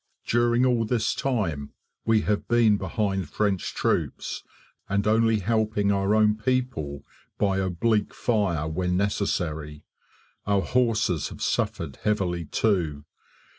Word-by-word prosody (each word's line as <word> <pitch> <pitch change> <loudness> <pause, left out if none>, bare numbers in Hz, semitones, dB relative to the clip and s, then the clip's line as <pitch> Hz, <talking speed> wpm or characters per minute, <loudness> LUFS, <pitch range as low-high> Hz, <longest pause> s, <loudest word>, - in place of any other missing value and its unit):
During 120 +1 +3
all 120 -3 +2
this 115 -1 0
time, 90 - -2 0.3
we 115 -1 +3
have 105 -1 -1
been 115 -3 +4
behind 95 -2 -2
French 100 -4 -1
troops, - - -1 0.5
and 100 0 +1
only 110 0 +3
helping 110 -1 +1
our 100 +1 +2
own 105 -1 +4
people 110 - -2 0.3
by 95 -2 +1
oblique 100 +3 0
fire 95 -10 0
when 90 +3 -1
necessary. 80 -7 -2 0.6
Our 100 -1 +2
horses 110 - +1
have - - -7
suffered 75 -6 -1
heavily 90 -5 -1
too. 80 -8 0
100 Hz, 120 wpm, -26 LUFS, 90-110 Hz, 0.6 s, been